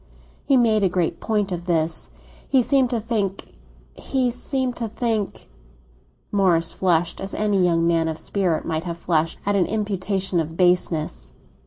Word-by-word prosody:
He 275 -2 +4
made 225 -3 +3
a 190 - +3
great 175 -2 -1
point 210 -3 -1
of 175 0 -4
this. 160 -2 0 0.4
He 260 -2 +4
seemed 265 -1 +3
to 240 -2 0
think—he 195 - -3
seemed 255 +1 -2
to 230 - -2
think—" 220 -2 -2 0.8
Morris 180 -5 +3
flushed, 175 -2 +1
as 195 +1 -5
any 205 -3 +1
young 165 -1 +2
man 165 -1 +2
of 160 -1 -3
spirit 180 -5 -1
might 160 +1 -2
have 170 -1 -4
flushed 165 -1 0
at 205 0 +1
an 190 -3 +2
imputation 195 -3 -1
of 160 0 -3
baseness. 165 - +1
185 Hz, 155 wpm, -23 LUFS, 165-215 Hz, 0.8 s, He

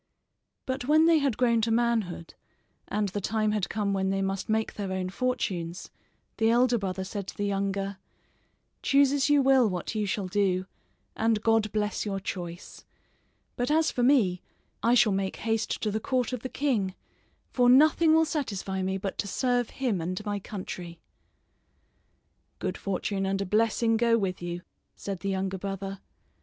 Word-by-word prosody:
But 260 -1 -3
when 310 +3 +5
they 330 -1 +5
had 275 -6 0
grown 235 -2 +3
to 225 - 0
manhood, 225 -7 0 0.5
and 205 -1 -1
the 205 +2 -4
time 215 +1 0
had 210 -3 -1
come 205 -2 -1
when 190 -1 0
they 195 0 0
must 195 +1 -3
make 220 0 0
their 200 -2 -4
own 185 -1 -2
fortunes, 185 -8 -2 0.5
the 225 0 +3
elder 240 0 +3
brother 190 -1 -3
said 195 0 -5
to - - -8
the 205 - -1
younger: 195 -1 -2 0.8
"Choose 275 -1 +4
as 285 0 +1
you 290 -1 +5
will 260 -4 +5
what 180 +1 -4
you 210 -2 -1
shall 195 0 -1
do, 185 -1 +1 0.5
and 220 -1 +1
God 225 -2 +2
bless 210 -1 -1
your 195 -2 -2
choice; 175 -2 -7 0.7
but 245 +2 -1
as 315 +1 +3
for 245 - -2
me 235 -9 +3 0.4
I 235 +1 +4
shall 220 -3 +5
make 190 0 -1
haste 225 0 -1
to 215 - 0
the 215 - -1
court 255 +1 -1
of 250 - -2
the 260 - -6
king, 220 -11 0 0.6
for 245 -1 +3
nothing 310 +4 +6
will 320 0 +5
satisfy 200 - -3
me 190 +1 -1
but 195 0 -5
to - - -1
serve 245 +2 0
him 240 -10 -1
and 185 +5 -4
my 205 -1 -2
country." 180 -4 -7 1.6
"Good - - -3
fortune 195 0 -2
and 195 0 0
a 200 - -1
blessing 225 +3 +2
go 230 0 +3
with 190 -5 -2
you," 175 0 -5 0.3
said 195 -2 -5
the 195 - -3
younger 190 0 -2
brother. 195 0 -5
210 Hz, 175 wpm, -28 LUFS, 190-245 Hz, 1.6 s, nothing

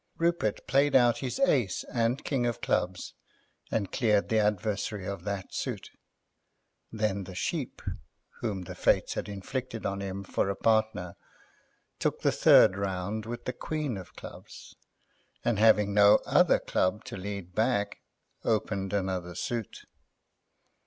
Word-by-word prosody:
Rupert 170 -11 0
played 140 +1 +3
out 120 -3 +5
his 125 -2 -3
ace 130 - +2
and 120 +3 -1
king 125 -4 0
of 120 - -2
clubs 90 0 -1 0.6
and 100 -4 -1
cleared 105 -5 +2
the 110 - +3
adversary 105 -1 -1
of 100 -3 -5
that 100 -2 -4
suit; - - -4 1.0
then 105 -3 -1
the 90 0 -9
Sheep, - - -3 0.6
whom 100 -6 -3
the - - -7
Fates - - +2
had - - -4
inflicted 115 +3 -5
on 100 0 -2
him 100 0 -4
for 95 - -1
a 100 - -1
partner, 110 -6 +1 0.8
took - - -1
the - - +3
third 95 - +6
round 100 +2 -3
with 120 +1 -6
the 125 - -2
queen 150 -2 -3
of 95 -2 -9
clubs, - - -11 0.7
and, 115 -4 +1
having 105 -2 +5
no 100 0 +7
other - - +4
club 105 +4 0
to - - -7
lead 100 -2 -6
back, 105 -1 0 0.4
opened 100 -3 -1
another 95 -3 -2
suit. 115 -3 -4
105 Hz, 140 wpm, -29 LUFS, 95-115 Hz, 1.0 s, no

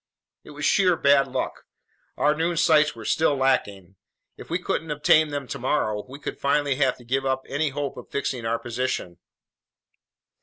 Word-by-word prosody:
It - - -14
was 145 0 -5
sheer 185 -3 +4
bad 140 0 +4
luck. - - -4 0.5
Our 150 - +3
noon 165 +2 -1
sights 150 -3 +4
were 115 -1 -10
still 155 +2 +2
lacking. 100 -9 -1 0.4
If - - -12
we 170 - 0
couldn't 165 -2 -3
obtain 150 +1 +4
them 145 -2 -4
tomorrow, 120 -6 -1
we 135 - -9
would - - -5
finally 140 0 +1
have 135 -3 +1
to 120 - -16
give 135 +3 0
up 130 0 -1
any 145 +2 -1
hope 140 0 -4
of - - -10
fixing 130 -3 -3
our 115 +1 0
position. 115 -7 -4
140 Hz, 175 wpm, -24 LUFS, 125-150 Hz, 0.5 s, sheer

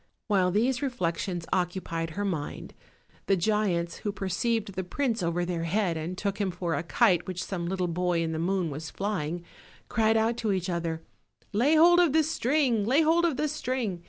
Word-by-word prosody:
While 190 -4 +2
these 240 +7 +1
reflections 180 - -2
occupied 175 -3 -2
her 205 - 0
mind, 160 -7 -4 0.5
the 195 - +3
giants, 180 -3 0
who 205 - -3
perceived 200 +2 -1
the 190 - -3
prince 230 +4 -1
over 175 +1 0
their 170 -2 -2
head 180 0 0
and 165 +3 -4
took 200 +1 -2
him 195 - +1
for 175 -1 -3
a - - 0
kite 175 0 +2
which 185 0 -3
some 175 -3 -4
little 185 0 -1
boy 175 0 0
in 165 - -2
the 160 - -3
moon 180 -1 0
was 155 +3 -6
fly 200 -6 -2
ing, 170 +2 -5 0.5
cried 220 0 +3
out 225 +1 +1
to 220 -4 0
each 185 -1 -2
other: 165 -1 -3 0.5
"Lay 260 +10 +3
hold 345 +3 +7
of 340 -5 +4
the 320 0 +4
string! 265 -6 +1
lay 265 +9 +3
bold 335 +2 +3
of 315 -6 0
the 305 +1 +1
string! 255 - -2
190 Hz, 195 wpm, -28 LUFS, 175-235 Hz, 0.5 s, hold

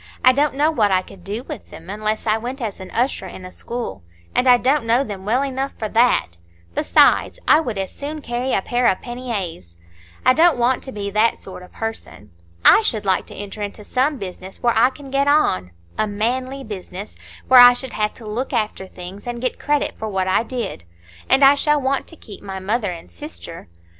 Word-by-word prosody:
I 255 - +8
don't 285 +1 +1
know 300 +3 +3
what 220 -9 +2
I 185 -1 +2
could 185 -1 -15
do 210 +6 -5
with 290 -5 -9
them - - -12
unless 215 +3 -2
I 215 -1 +3
went 250 +4 -5
as 215 -5 -5
usher 210 +1 -1
in 185 0 -10
a 185 - -9
school; 240 +4 -6 0.3
and 255 - +2
I 250 -1 +8
don't 265 +1 +1
know 235 +4 +3
them 200 -6 -7
well 245 +6 +2
enough 270 0 -3
for 220 - -3
that! 225 - +2 0.4
besides, - - +3
I 305 - +7
would 240 -10 -3
as 190 -1 -3
soon 300 +2 -6
carry 245 +2 -2
a 190 - +1
pair 245 0 +1
of 185 - +2
panniers. 205 - -5 0.5
I 255 - +7
don't 330 +1 +4
want 245 +1 +2
to 265 - -7
be 200 -3 -4
that 215 +3 +2
sort 190 -1 -10
of 180 - -14
person. 225 - -7 0.3
I - - +8
should 220 - -1
like 190 -1 +1
to - - -10
enter 205 +1 -7
into 205 +1 -6
some 270 +6 0
business 190 -1 -8
where 240 -1 +3
I 225 +3 +5
can 275 0 -12
get 275 +1 +1
on,—a 90 - 0
manly 255 +6 -2
business, 200 -2 -8 0.3
where 255 -1 +8
I 245 0 +10
should 260 +1 -4
have 210 0 -1
to 230 - -12
look 240 +6 -3
after 215 -4 -2
things, 185 +4 -10
and 240 0 -4
get 255 +1 -2
credit 295 0 -1
for 220 - -3
what 190 -2 -1
I 190 - +3
did. 235 - -5 0.5
And 265 +2 +5
I 275 +1 +9
shall 295 +1 +2
want 270 0 -1
to 330 - -9
keep 215 -10 -12
my 195 -1 -6
mother 205 +3 -1
and 170 -2 -8
sister." 170 - -9
230 Hz, 215 wpm, -21 LUFS, 195-260 Hz, 0.5 s, I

